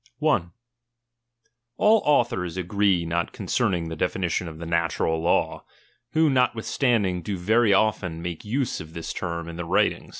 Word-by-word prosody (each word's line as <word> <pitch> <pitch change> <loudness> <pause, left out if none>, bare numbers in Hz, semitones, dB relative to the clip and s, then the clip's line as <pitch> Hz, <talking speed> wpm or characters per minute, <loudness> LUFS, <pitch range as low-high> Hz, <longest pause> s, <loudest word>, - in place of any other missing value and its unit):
I. 150 - +2 1.3
All 215 0 +5
authors 115 - +1
agree 95 -1 +1
not 85 +1 -2
concerning 85 -3 -1
the 80 - -5
definition 90 +2 -1
of 80 -1 -8
the 85 - -7
natural 85 -1 0
law, 85 - +1 0.5
who 160 0 +4
notwithstanding 120 -6 +1
do 95 +3 -4
very 110 +5 +3
1 100 - +6
often 90 -6 -1
nuike 85 -2 -5
use 125 +4 -2
of 80 0 -11
this 85 -1 -5
term 85 -2 -4
in 85 0 -7
their 90 - -4
writing. - - +1
90 Hz, 155 wpm, -25 LUFS, 85-115 Hz, 1.3 s, 1